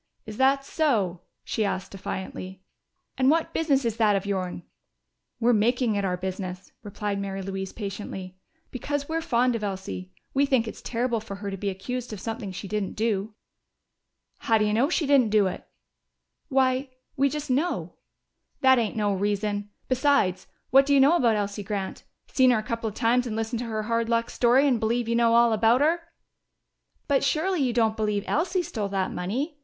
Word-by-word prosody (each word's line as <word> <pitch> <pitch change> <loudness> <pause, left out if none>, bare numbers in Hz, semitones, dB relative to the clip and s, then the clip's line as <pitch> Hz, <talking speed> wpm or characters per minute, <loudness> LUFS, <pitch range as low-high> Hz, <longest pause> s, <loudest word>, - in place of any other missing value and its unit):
"Is 215 -1 -8
that 275 +1 +3
so?" 215 - 0 0.2
she 220 - -1
asked 190 -2 -2
defiantly. 190 -1 -6 0.6
"And 260 0 +4
what 325 +2 +1
business 280 -5 +1
is 230 -1 -1
that 215 -2 +4
of 195 0 -1
your'n?" 185 -3 -3 0.8
"We're 240 +1 +4
making 235 +2 +2
it 200 -1 -1
our 180 -2 0
business," 185 0 -5
replied 205 -1 -4
Mary 195 -1 -4
Louise 190 0 -4
patiently, 195 -3 -6 0.4
"because 285 +2 -3
we're 325 +1 -1
fond 245 -3 +2
of 220 - -4
Elsie. 95 - -5 0.2
We 280 +1 +3
think 255 -4 +2
it's - - -7
terrible 235 -1 -1
for 210 -2 -8
her 200 0 -5
to - - -3
be 200 +1 -2
accused 240 +6 -5
of 210 - -6
something 225 -1 -5
she 195 +2 -7
didn't 210 -1 -2
do." 210 -1 -1 1.0
"How 225 - +2
do 215 - +2
you 210 - +1
know 245 +7 +3
she 340 -2 +1
didn't 275 -5 +4
do 210 -1 +4
it?" 185 - -4 0.8
"Why 260 0 +2 0.3
we 275 +1 +3
just 295 0 -4
know." 300 +8 -1 0.7
"That 260 -1 +6
ain't 225 -3 -1
no 205 -2 +1
reason! 205 +1 -1 0.2
Besides, 255 -8 +2 0.2
what 270 +2 +6
do 285 - +4
you - - +6
know 280 +5 +6
about 235 -9 +3
Elsie 205 0 -2
Grant? 200 -1 -4 0.2
Seen 260 -1 +3
her 245 - +4
a 215 - -2
couple 230 +1 -3
of 210 - -12
times 245 +1 +2
and 220 - -3
listened 225 +1 -2
to 245 - -3
her 215 -1 -2
hard 230 +1 0
luck 230 0 +1
story 255 +4 +4
and 250 -4 +2
believe 230 +1 0
you 235 - +1
know 230 -1 +4
all 235 -1 +5
about 225 +4 +3
her!" 325 +4 +3 1.1
"But 280 -2 +2
surely 355 +1 +1
you 255 -2 +2
don't 225 -2 +2
believe 210 -2 -1
Elsie 355 +3 0
stole 215 -10 -3
that 190 -1 -1
money?" 265 - -3
225 Hz, 190 wpm, -26 LUFS, 200-260 Hz, 1.1 s, That